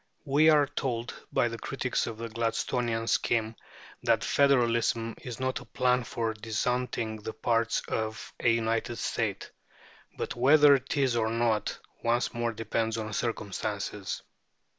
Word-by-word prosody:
We 150 Hz, +3 st, +5 dB
are 150 Hz, -2 st, +6 dB
told 130 Hz, -4 st, -3 dB, 0.2 s
by -, -, +2 dB
the 115 Hz, 0 st, -5 dB
critics 130 Hz, 0 st, -1 dB
of 115 Hz, -2 st, -5 dB
the 115 Hz, +1 st, -4 dB
Gladstonian 115 Hz, +1 st, -1 dB
scheme 115 Hz, -1 st, +1 dB, 0.5 s
that -, -, +2 dB
federalism 120 Hz, -4 st, +2 dB
is 125 Hz, -1 st, -7 dB
not 130 Hz, 0 st, -1 dB
"a -, -, -12 dB
plan 125 Hz, +1 st, +1 dB
for 115 Hz, -1 st, -2 dB
disuniting 115 Hz, +1 st, -2 dB
the 110 Hz, +1 st, -5 dB
parts 115 Hz, -1 st, +1 dB
of 110 Hz, -1 st, -3 dB
a -, -, +3 dB
united 115 Hz, +1 st, 0 dB
state." -, -, -2 dB, 0.7 s
But -, -, -3 dB
whether 145 Hz, +4 st, +7 dB
it 135 Hz, +1 st, 0 dB
is 135 Hz, -4 st, +2 dB
or 110 Hz, -1 st, +1 dB
not 115 Hz, -1 st, 0 dB, 0.3 s
once 120 Hz, +1 st, +1 dB
more 120 Hz, -1 st, -1 dB
depends 115 Hz, 0 st, -1 dB
on 110 Hz, -1 st, -4 dB
circumstances. 105 Hz, -2 st, -3 dB
115 Hz, 140 wpm, -29 LUFS, 110-125 Hz, 0.7 s, whether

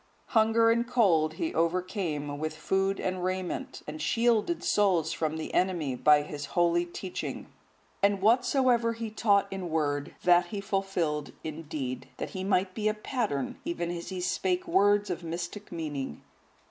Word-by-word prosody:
Hunger 230 Hz, -1 st, +4 dB
and 235 Hz, +1 st, +1 dB
cold 180 Hz, -11 st, +3 dB
he 160 Hz, -, -2 dB
overcame 165 Hz, -4 st, -1 dB
with 155 Hz, 0 st, -3 dB
food 195 Hz, +4 st, 0 dB
and 185 Hz, -1 st, -2 dB
raiment, 185 Hz, 0 st, -3 dB
and 155 Hz, +1 st, -6 dB
shielded 235 Hz, -, +1 dB
souls 180 Hz, -6 st, +2 dB
from 160 Hz, -1 st, -2 dB
the 160 Hz, -, -5 dB
enemy 170 Hz, -8 st, +1 dB
by 150 Hz, +3 st, +5 dB
his 145 Hz, -1 st, -6 dB
holy 175 Hz, 0 st, +3 dB
teaching. 180 Hz, +1 st, -5 dB, 0.6 s
And 200 Hz, 0 st, +3 dB
whatsoever 240 Hz, +2 st, +3 dB
he 225 Hz, -1 st, -5 dB
taught 205 Hz, -2 st, +3 dB
in 185 Hz, -3 st, -4 dB
word, 145 Hz, -3 st, -1 dB
that 175 Hz, 0 st, +5 dB
he 200 Hz, +3 st, -4 dB
fulfilled 195 Hz, -7 st, -1 dB
in 155 Hz, 0 st, -5 dB
deed, 130 Hz, -5 st, -4 dB
that -, -, -5 dB
he 185 Hz, -, -4 dB
might 185 Hz, -1 st, +1 dB
be 215 Hz, +1 st, -1 dB
a 215 Hz, -, +1 dB
pattern, 215 Hz, -, -2 dB
even 170 Hz, 0 st, -2 dB
as 170 Hz, -1 st, -5 dB
he 185 Hz, -2 st, -4 dB
spake 185 Hz, 0 st, 0 dB
words 205 Hz, +2 st, +3 dB
of 175 Hz, -, -4 dB
mystic 170 Hz, +5 st, -5 dB
meaning. 150 Hz, -5 st, -4 dB
180 Hz, 160 wpm, -29 LUFS, 160-205 Hz, 0.6 s, by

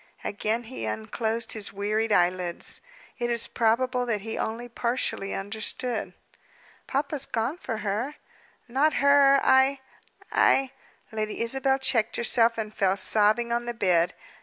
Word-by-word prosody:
Again 220 Hz, +3 st, -2 dB
he 230 Hz, -, -7 dB
unclosed 220 Hz, -, -3 dB
his 215 Hz, -2 st, -4 dB
wearied 215 Hz, +2 st, -1 dB
eyelids. 180 Hz, -2 st, 0 dB, 0.4 s
It 240 Hz, 0 st, -1 dB
is 235 Hz, -1 st, +3 dB
probable 245 Hz, +2 st, +1 dB
that 215 Hz, -4 st, -1 dB
he 225 Hz, +2 st, -5 dB
only 230 Hz, +2 st, -3 dB
partially 235 Hz, -4 st, -2 dB
understood. 220 Hz, +4 st, -3 dB, 0.7 s
"Papa's 280 Hz, 0 st, -1 dB
gone 230 Hz, +8 st, -2 dB
for 230 Hz, -10 st, -5 dB
her." 225 Hz, +9 st, -2 dB, 0.5 s
"Not 275 Hz, +6 st, +2 dB
her! 280 Hz, -1 st, +5 dB
I 265 Hz, +1 st, +4 dB, 0.5 s
I 270 Hz, -1 st, +3 dB, 0.2 s
" -, -, -34 dB
Lady 215 Hz, -1 st, -3 dB
Isabel 265 Hz, +3 st, +2 dB
checked 230 Hz, -4 st, +1 dB
herself, 235 Hz, -1 st, +3 dB
and 215 Hz, -1 st, -4 dB
fell 195 Hz, -1 st, +1 dB
sobbing 215 Hz, +4 st, +2 dB
on 240 Hz, 0 st, -1 dB
the 240 Hz, 0 st, -4 dB
bed. 180 Hz, -5 st, +2 dB
230 Hz, 135 wpm, -26 LUFS, 210-255 Hz, 0.7 s, her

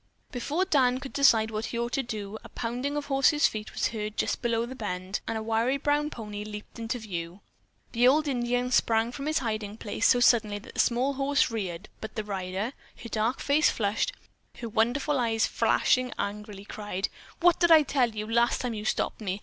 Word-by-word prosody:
Before 295 Hz, +8 st, -1 dB
Dan 260 Hz, -7 st, +3 dB
could 270 Hz, 0 st, -8 dB
decide 225 Hz, -6 st, +4 dB
what 215 Hz, +1 st, -3 dB
he 235 Hz, -, -4 dB
ought 235 Hz, 0 st, -2 dB
to 270 Hz, -, +1 dB
do, 215 Hz, -3 st, -6 dB
a -, -, -11 dB
pounding 250 Hz, +5 st, -3 dB
of 290 Hz, -, -3 dB
horse's 285 Hz, +2 st, +3 dB
feet 215 Hz, 0 st, -1 dB
was -, -, 0 dB
heard 215 Hz, -1 st, -5 dB
just -, -, -1 dB
below 235 Hz, -1 st, 0 dB
the 250 Hz, -, -7 dB
bend, 190 Hz, -5 st, -4 dB
and 225 Hz, -, -1 dB
a 220 Hz, -, -4 dB
wiry 230 Hz, +4 st, +1 dB
brown 290 Hz, +1 st, +1 dB
pony 210 Hz, -5 st, -6 dB
leaped 210 Hz, +1 st, -9 dB
into 230 Hz, +2 st, -2 dB
view. 180 Hz, -4 st, -6 dB, 0.5 s
The 240 Hz, +1 st, +4 dB
old 300 Hz, +4 st, +4 dB
Indian 245 Hz, -1 st, 0 dB
sprang 225 Hz, -2 st, +2 dB
from 275 Hz, +3 st, -6 dB
his 310 Hz, 0 st, +1 dB
hiding 215 Hz, -2 st, -3 dB
place 220 Hz, +1 st, 0 dB
so 245 Hz, -, +5 dB
suddenly 220 Hz, -4 st, +4 dB
that 205 Hz, -, -12 dB
the -, -, -7 dB
small 255 Hz, +3 st, +2 dB
horse 275 Hz, -2 st, +1 dB
reared, 190 Hz, -7 st, -4 dB
but 220 Hz, -, -8 dB
the 215 Hz, -, -2 dB
rider, 195 Hz, +3 st, -3 dB, 0.3 s
her 230 Hz, -, -7 dB
dark 225 Hz, +4 st, 0 dB
face 290 Hz, +2 st, +3 dB
flushed, 215 Hz, -, 0 dB, 0.5 s
her 235 Hz, -, -5 dB
wonderful 250 Hz, +6 st, +1 dB
eyes 225 Hz, -2 st, +2 dB
flashing 255 Hz, -1 st, +2 dB
angrily, 205 Hz, -1 st, -5 dB
cried: 205 Hz, -2 st, -3 dB, 0.3 s
"What 350 Hz, 0 st, +4 dB
did 345 Hz, -1 st, +4 dB
I 320 Hz, -2 st, +8 dB
tell 260 Hz, -4 st, +1 dB
you 210 Hz, 0 st, -3 dB
last 235 Hz, +2 st, +2 dB
time 245 Hz, -2 st, -2 dB
you 210 Hz, -1 st, -5 dB
stopped 220 Hz, -, -1 dB
me? 195 Hz, -1 st, -3 dB
230 Hz, 205 wpm, -28 LUFS, 210-265 Hz, 0.5 s, I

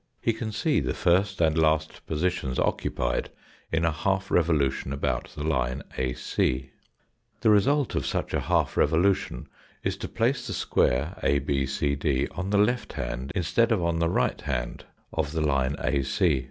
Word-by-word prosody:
He 115 Hz, -, +1 dB
can 110 Hz, 0 st, -4 dB
see 150 Hz, +8 st, +1 dB
the 65 Hz, -2 st, -2 dB
first 95 Hz, +2 st, +2 dB
and 80 Hz, -1 st, +3 dB
last 80 Hz, -1 st, +1 dB
positions 80 Hz, -5 st, -1 dB
occupied -, -, -1 dB, 0.4 s
in 80 Hz, +1 st, +1 dB
a 80 Hz, -, +3 dB
half 95 Hz, +5 st, -1 dB
revolution 75 Hz, -6 st, +1 dB
about 65 Hz, -3 st, -1 dB
the 75 Hz, -, -3 dB
line 70 Hz, -3 st, 0 dB
AC. 65 Hz, 0 st, -1 dB, 0.7 s
The 110 Hz, -, +4 dB
result 140 Hz, +7 st, +3 dB
of -, -, -1 dB
such -, -, -2 dB
a -, -, +2 dB
half -, -, +1 dB
revo 80 Hz, -, +3 dB
lution 95 Hz, +1 st, +1 dB, 0.4 s
is -, -, -1 dB
to -, -, -5 dB
place 120 Hz, +2 st, 0 dB
the -, -, -3 dB
square 65 Hz, +7 st, +1 dB
ABCD 70 Hz, 0 st, 0 dB
on 95 Hz, +2 st, -3 dB
the 100 Hz, -, +2 dB
left 120 Hz, +4 st, +1 dB
hand 65 Hz, +2 st, -4 dB
instead 115 Hz, +7 st, +2 dB
of 100 Hz, -6 st, +2 dB
on 85 Hz, -1 st, 0 dB
the 85 Hz, 0 st, +2 dB
right -, -, 0 dB
hand 60 Hz, -5 st, -3 dB, 0.3 s
of 80 Hz, -2 st, -1 dB
the 80 Hz, -, -1 dB
line 70 Hz, -2 st, +1 dB
AC. 70 Hz, +3 st, +2 dB
80 Hz, 165 wpm, -26 LUFS, 70-95 Hz, 0.7 s, The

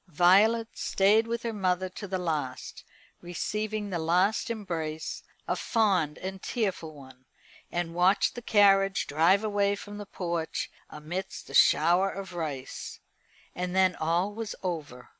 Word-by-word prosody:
Violet 200 Hz, +7 st, +4 dB
stayed 210 Hz, +4 st, +2 dB
with 235 Hz, 0 st, -3 dB
her 230 Hz, -1 st, -2 dB
mother 185 Hz, -2 st, 0 dB
to 195 Hz, +3 st, -8 dB
the 190 Hz, 0 st, -2 dB
last, 155 Hz, -8 st, -4 dB, 0.4 s
receiving 210 Hz, +4 st, -3 dB
the 175 Hz, -, -1 dB
last 180 Hz, +8 st, +1 dB
embrace 165 Hz, -8 st, -4 dB, 0.3 s
a -, -, 0 dB
fond 190 Hz, -, +1 dB
and 190 Hz, 0 st, -6 dB
tearful 190 Hz, -9 st, -3 dB
one 130 Hz, -2 st, -15 dB, 0.5 s
and 175 Hz, -1 st, -2 dB
watched 180 Hz, +3 st, +3 dB
the 240 Hz, -, -7 dB
carriage 195 Hz, -3 st, +4 dB
drive 170 Hz, +7 st, +3 dB
away 205 Hz, -1 st, +1 dB
from 205 Hz, +1 st, -9 dB
the 205 Hz, -, -7 dB
porch 170 Hz, -4 st, -3 dB, 0.2 s
amidst 160 Hz, +5 st, -6 dB
a -, -, -10 dB
shower 175 Hz, +6 st, +5 dB
of 190 Hz, -2 st, -7 dB
rice. 150 Hz, -6 st, -5 dB, 0.5 s
And 180 Hz, 0 st, -3 dB
then 185 Hz, -1 st, +4 dB
all 170 Hz, +6 st, 0 dB
was 225 Hz, 0 st, -5 dB
over. 150 Hz, -9 st, -5 dB
185 Hz, 140 wpm, -28 LUFS, 165-205 Hz, 0.5 s, shower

